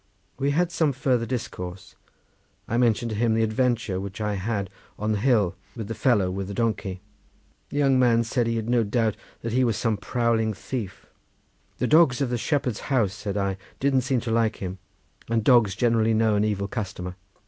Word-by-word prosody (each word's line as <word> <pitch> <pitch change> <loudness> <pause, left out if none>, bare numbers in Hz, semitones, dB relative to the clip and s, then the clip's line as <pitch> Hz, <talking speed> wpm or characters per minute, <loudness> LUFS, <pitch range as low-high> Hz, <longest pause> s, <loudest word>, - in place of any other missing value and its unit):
We 140 +1 +1
had 170 +4 +1
some 160 -4 +1
further 125 -2 0
discourse. 90 -7 -5 0.7
I 115 - -2
mentioned 120 -1 +2
to - - -2
him 115 +1 +2
the 115 - +2
adventure 110 -3 0
which 100 +1 -6
I 105 -1 -1
had 100 -1 -2 0.3
on 105 +1 -1
the 105 - 0
hill 110 -6 +2 0.2
with 110 -4 -5
the - - -2
fellow 105 -7 +2
with 95 0 -4
the 100 - -6
donkey. 105 -5 -1 0.7
The - - -5
young 135 -2 +4
man 120 -2 +4
said 120 0 0
that - - 0
he 115 - 0
had 110 -1 -2
no 120 -1 +3
doubt 110 0 0 0.3
that 115 -1 -3
he 130 +1 +3
was 115 -4 +1
some 115 -2 0
prowling 115 0 0
thief. 105 -4 -6 0.7
"The - - 0
dogs 155 -5 +5
of 135 -3 0
the 120 - 0
shepherd's 130 -5 -1
house," 115 -8 +2
said 105 -1 -4
I, 100 -1 -1 0.2
"didn't 135 -1 +2
seem 130 -1 0
to 115 - -3
like 115 -1 +2
him, 95 0 -6 0.5
and 115 -1 +1
dogs 110 -6 +5
generally 115 -1 +2
know 110 -1 +3
an 105 0 +2
evil 100 -2 -1
customer. 95 -5 -5
115 Hz, 200 wpm, -25 LUFS, 105-125 Hz, 0.7 s, dogs